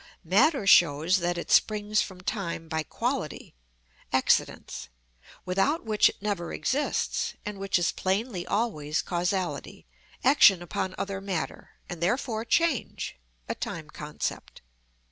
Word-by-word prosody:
Matter 220 - +3
shows 170 -1 +5
that 175 -1 -1
it 170 - -5
springs 210 0 +3
from 185 -2 -6
time 170 -4 -3
by 160 0 -1
quality 155 - -3 0.6
(accidents), - - +1 0.6
without 195 - +1
which 215 -2 +4
it - - -11
never 200 -5 -2
exists, 290 +3 -1
and 210 -2 -5
which 195 0 +1
is 175 -1 +1
plainly 190 0 -1
always 155 -10 -1
causality, 180 +1 -2 0.4
action 205 -9 +6
upon 185 +2 -3
other 195 0 -3
matter, 190 -5 -4
and 175 -2 -7
therefore 220 +4 0
change 290 - 0 0.3
(a - - -1
time 155 -2 -6
concept). 150 0 -5
190 Hz, 125 wpm, -27 LUFS, 170-215 Hz, 0.6 s, action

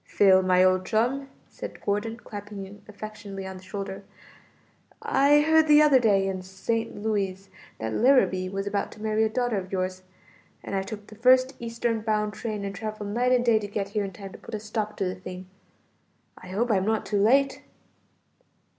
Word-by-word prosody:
"Phil, 190 -2 +4
my 185 0 +4
old 185 0 +3
chum," 250 +7 0 0.2
said - - -8
Gordon, 210 +3 -2
clapping 205 -3 -8
him 200 +2 -13
affectionately 205 -2 -8
on 190 0 -7
the - - -12
shoulder, 195 +1 -6 1.0
"I 285 +2 +4
heard 320 +1 +4
the 300 0 +7
other 285 -3 +6
day 200 -5 +3
in 190 -1 -3
St. 190 +5 -3
Louis, 195 -3 -2 0.3
that 110 0 -4
Larrabee 215 - +3
was 195 +1 -3
about 205 0 -2
to - - -16
marry 215 0 +1
a 220 - +2
daughter 245 -1 0
of 185 0 -9
yours, 185 -1 -2 0.6
and - - -6
I 195 - +1
took 205 +1 -7
the 215 - -14
first 255 +3 +4
eastern 230 -1 -2
bound 210 -1 0
train 210 -2 -4
and 200 - -4
traveled 215 0 -5
night 245 +4 +1
and 250 -1 +3
day 230 -2 +4
to 205 - -5
get 200 -1 -3
here 205 +1 -1
in 195 - -4
time 195 +1 -9
to - - -12
put 230 - -7
a - - -4
stop 210 0 -4
to - - -1
the 185 - -1
thing. 185 0 -8 0.9
I - - -13
hope 220 +6 -1
I'm 190 -3 +2
not 220 0 0
too 205 -2 0
late." 270 +6 +3
210 Hz, 195 wpm, -26 LUFS, 195-230 Hz, 1.0 s, the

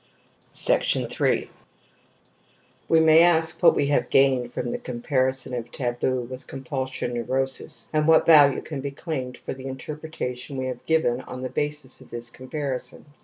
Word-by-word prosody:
3 - - +1 1.4
We 165 - +5
may 160 0 +7
ask 165 -1 +3
what 175 - +6
we - - +2
have 145 - +1
gained 130 -3 +3
from 120 -1 -3
the - - -3
co 125 - -7
mparison 130 +1 -1
of 120 0 -6
taboo 125 0 -1
with 125 +2 -8
compulsion 130 -2 -4
neurosis 130 +5 -2
an3 155 0 +2
what 160 0 +5
value 145 -4 +6
can 145 -4 -5
be 140 - -3
claimed 135 -3 -5
for - - -6
the 130 0 -10
interpre 150 +4 -7
tation 125 -2 -5
we 130 - -2
have 125 -1 -5
given 145 -7 +2
on 125 0 -8
the 130 - -3
basis 145 -2 -3
of 130 - -14
this 120 0 -4
com 130 +1 -12
parison 140 -4 -4
130 Hz, 170 wpm, -24 LUFS, 125-150 Hz, 1.4 s, may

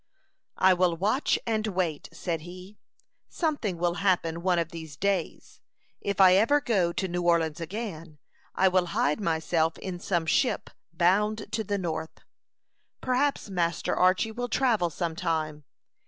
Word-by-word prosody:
"I 190 0 +5
will 175 -2 +1
watch 215 - +1
and 220 -1 0
wait," 180 -6 -2
said 165 -3 -3
he. 180 +4 -11 0.5
"Something 290 - -2
will 170 0 0
happen 170 -4 +1
one 180 0 +2
of 165 -1 0
these 160 -4 -9
days. 195 -2 -2 0.4
If 200 -1 -3
I 185 -1 +8
ever 225 +10 +4
go 195 -11 +1
to 190 - -2
New 175 0 -2
Orleans 170 -2 +1
again, 165 -4 -6 0.4
I 190 - +4
will 185 -1 +2
hide 150 +8 +1
myself 165 -2 0
in 180 -2 -6
some 175 -2 -1
ship 245 +10 +1 0.2
bound 205 +6 +1
to 225 -1 -1
the 205 0 -2
North. 165 -3 -4 0.8
Perhaps 255 -4 0
Master 170 -2 0
Archy 185 +5 +3
will 245 +2 -4
travel 225 -9 +2
some 165 0 -3
time. 155 -4 -2
180 Hz, 150 wpm, -27 LUFS, 165-210 Hz, 0.8 s, I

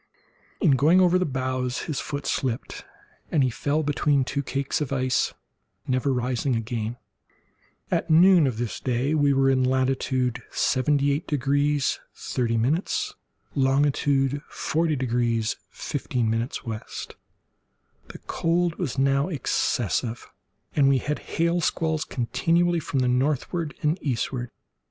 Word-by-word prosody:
In 170 - +4
going 150 +7 +5
over 180 0 +4
the 185 - 0
bows 130 -2 -2
his 155 -4 -3
foot 145 -1 -5
slipped, 125 -3 -2 0.5
and 150 -4 +3
he 130 - +1
fell 145 +5 -1
between 145 -1 +2
two 135 +2 -2
cakes 140 +1 -2
of 145 - -2
ice, 130 -1 0 0.5
never 130 +2 0
rising 125 +1 0
again. 115 0 -3 0.9
At - - 0
noon 170 -1 +6
of 120 -4 -2
this 120 -1 -3
day 130 +3 0
we 145 -2 +3
were 135 0 +3
in 130 -1 +2
latitude 130 -1 0
78 140 +3 +1
degrees 145 -1 +1 0.2
30', 125 - -1 0.4
longitude 140 0 +2
40 160 -1 0
degrees 120 -3 0
15' 125 -5 -2 0.2
W. 115 -7 -5 1.3
The - - -9
cold 170 0 0
was 150 -8 -2
now 140 +1 +2
excessive, 120 - -1 0.5
and 140 -2 +5
we 135 - +4
had 150 +4 -2
hail 170 +1 0
squalls 160 -1 0
continually 170 +7 +1
from 140 -3 -1
the 125 - +2
northward 150 +5 0
and 155 +5 +1
eastward. 125 -2 -2
135 Hz, 125 wpm, -25 LUFS, 125-150 Hz, 1.3 s, noon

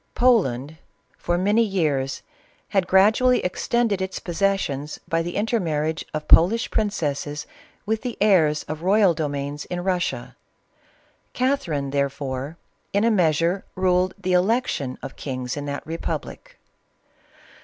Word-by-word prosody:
Poland, 160 - +2 0.4
for 175 0 -1
many 205 +5 +3
years, 155 -11 0 0.5
had 190 -3 +1
gradually 220 +7 +5
extended 210 +2 0
its 190 0 -3
possessions 170 -6 -1
by 165 0 +1
the 175 +1 -5
inter 225 +3 +1
marriage 160 -2 -1
of 155 0 -5
Polish 215 +8 +5
princesses 150 -8 -2 0.4
with 220 +1 -1
the 250 -2 -5
heirs 165 -8 +3
of 155 +1 -6
royal 195 0 +4
domains 145 -1 -3
in 180 - -4
Eussia. 180 -1 -2 1.0
Catherine, 170 - -1
therefore, 140 +1 -2 0.4
in 200 +1 +2
a 230 - +4
measure 170 -1 +2
ruled 185 0 +1
the 185 - -2
election 180 - +1
of - - -7
kings 130 -3 -4
in 145 0 -5
that 140 0 -4
republic. 170 - -5
175 Hz, 125 wpm, -23 LUFS, 150-205 Hz, 1.0 s, gradually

